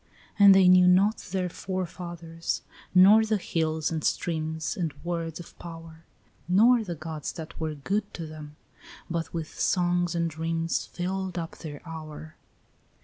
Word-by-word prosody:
And 200 Hz, -1 st, +9 dB
they 190 Hz, -1 st, +6 dB
knew 180 Hz, 0 st, +7 dB
not 195 Hz, +4 st, +4 dB
their 185 Hz, 0 st, -2 dB
forefathers, 170 Hz, -2 st, -4 dB, 0.3 s
nor 200 Hz, +4 st, +8 dB
the 220 Hz, -1 st, +1 dB
hills 160 Hz, -4 st, -1 dB
and 160 Hz, -2 st, -2 dB
streams 160 Hz, -2 st, -1 dB
And 165 Hz, -6 st, -3 dB
words 170 Hz, -2 st, -3 dB
of 175 Hz, -, -11 dB
power, 165 Hz, -1 st, -10 dB, 0.4 s
Nor 225 Hz, +6 st, +5 dB
the 175 Hz, -5 st, -5 dB
gods 155 Hz, -1 st, -5 dB
that 160 Hz, -2 st, -9 dB
were 160 Hz, -1 st, -2 dB
good 200 Hz, +8 st, -2 dB
to 165 Hz, -, -5 dB
them, 155 Hz, -1 st, -10 dB, 0.6 s
but 165 Hz, -1 st, -2 dB
with 165 Hz, -2 st, -6 dB
songs 175 Hz, -1 st, +1 dB
and 170 Hz, 0 st, +1 dB
dreams 165 Hz, +1 st, -2 dB
Filled 185 Hz, 0 st, -3 dB
up 165 Hz, -1 st, -5 dB
their 150 Hz, 0 st, -9 dB
hour. 155 Hz, -1 st, -8 dB
170 Hz, 145 wpm, -27 LUFS, 160-185 Hz, 0.6 s, And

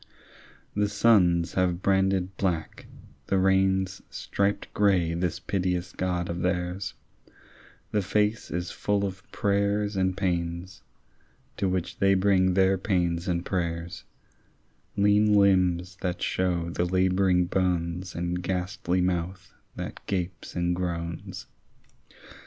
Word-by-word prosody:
The 105 Hz, 0 st, +1 dB
suns 95 Hz, -6 st, +3 dB
have 90 Hz, -1 st, 0 dB
branded 95 Hz, -1 st, +1 dB
black, 85 Hz, -5 st, -2 dB, 0.4 s
the 95 Hz, -, +2 dB
rains 95 Hz, 0 st, +2 dB
Striped 100 Hz, 0 st, -2 dB
grey 95 Hz, -5 st, +2 dB
this 85 Hz, +1 st, -1 dB
piteous 90 Hz, -1 st, -1 dB
God 90 Hz, -1 st, -2 dB
of 85 Hz, +1 st, -4 dB
theirs; 90 Hz, +2 st, -2 dB, 1.0 s
The 105 Hz, -, +1 dB
face 105 Hz, +3 st, 0 dB
is 90 Hz, +1 st, -3 dB
full 100 Hz, -1 st, 0 dB
of 95 Hz, 0 st, -5 dB
prayers 100 Hz, +1 st, 0 dB
and 95 Hz, -1 st, 0 dB
pains, 85 Hz, -1 st, -2 dB, 0.8 s
To 100 Hz, -2 st, 0 dB
which 90 Hz, -1 st, -3 dB
they 95 Hz, 0 st, +4 dB
bring 95 Hz, -1 st, +3 dB
their 95 Hz, 0 st, +3 dB
pains 85 Hz, -4 st, 0 dB
and 85 Hz, -1 st, -1 dB
prayers; 85 Hz, -2 st, -3 dB, 0.9 s
Lean 105 Hz, +1 st, +4 dB
limbs 90 Hz, -2 st, +3 dB
that 90 Hz, -1 st, -2 dB
shew 85 Hz, -2 st, 0 dB
the 85 Hz, -, 0 dB
labouring 95 Hz, 0 st, +2 dB
bones, 90 Hz, -1 st, -1 dB
And 90 Hz, +1 st, -2 dB
ghastly 90 Hz, 0 st, -1 dB
mouth 90 Hz, +1 st, -2 dB, 0.2 s
that -, -, -7 dB
gapes 90 Hz, -3 st, -3 dB
and 90 Hz, 0 st, 0 dB
groans. 85 Hz, -2 st, -4 dB
90 Hz, 120 wpm, -27 LUFS, 90-95 Hz, 1.0 s, they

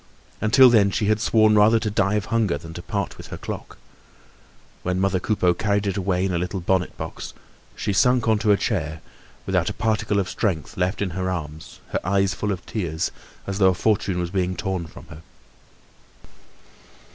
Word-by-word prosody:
Until 125 Hz, +4 st, +6 dB
then, 105 Hz, -4 st, +5 dB
she 105 Hz, -, -1 dB
had 110 Hz, +1 st, +2 dB
sworn 110 Hz, -2 st, +4 dB
rather 105 Hz, +2 st, +6 dB
to 110 Hz, -1 st, -2 dB
die 100 Hz, 0 st, +1 dB
of 105 Hz, -2 st, -1 dB
hunger 110 Hz, -9 st, +2 dB
than 80 Hz, +3 st, -10 dB
to 85 Hz, -, -7 dB
part 100 Hz, +1 st, -3 dB
with -, -, -9 dB
her -, -, -7 dB
clock. -, -, -7 dB, 1.0 s
When 90 Hz, 0 st, -1 dB
mother 95 Hz, -1 st, +1 dB
Coupeau 90 Hz, -2 st, +1 dB
carried 100 Hz, +1 st, 0 dB
it 100 Hz, -2 st, -1 dB
away 95 Hz, -1 st, 0 dB
in 95 Hz, -, -1 dB
a 85 Hz, -, 0 dB
little 90 Hz, +2 st, -3 dB
bonnet 90 Hz, 0 st, 0 dB
box, -, -, -7 dB, 0.4 s
she 100 Hz, -, -2 dB
sunk 125 Hz, +3 st, +3 dB
on 110 Hz, -1 st, +3 dB
to 110 Hz, -1 st, +2 dB
a 100 Hz, -, +5 dB
chair, 80 Hz, -9 st, -2 dB, 0.4 s
without -, -, +1 dB
a -, -, -4 dB
particle 105 Hz, -2 st, 0 dB
of 95 Hz, -, -1 dB
strength 90 Hz, -, -2 dB
left 90 Hz, +3 st, -1 dB
in 95 Hz, -, -3 dB
her 95 Hz, +2 st, -2 dB
arms, 80 Hz, -3 st, -6 dB
her -, -, -1 dB
eyes 95 Hz, +1 st, +1 dB
full 105 Hz, -, -2 dB
of 90 Hz, -4 st, -5 dB
tears, 80 Hz, -7 st, -2 dB, 0.3 s
as 100 Hz, 0 st, -4 dB
though 95 Hz, -2 st, +6 dB
a 90 Hz, -, +1 dB
fortune 100 Hz, -2 st, 0 dB
was 90 Hz, -1 st, -2 dB
being 95 Hz, -1 st, -1 dB
torn 95 Hz, -4 st, -3 dB
from -, -, -13 dB
her. 75 Hz, +1 st, -11 dB
95 Hz, 195 wpm, -23 LUFS, 90-105 Hz, 1.0 s, Until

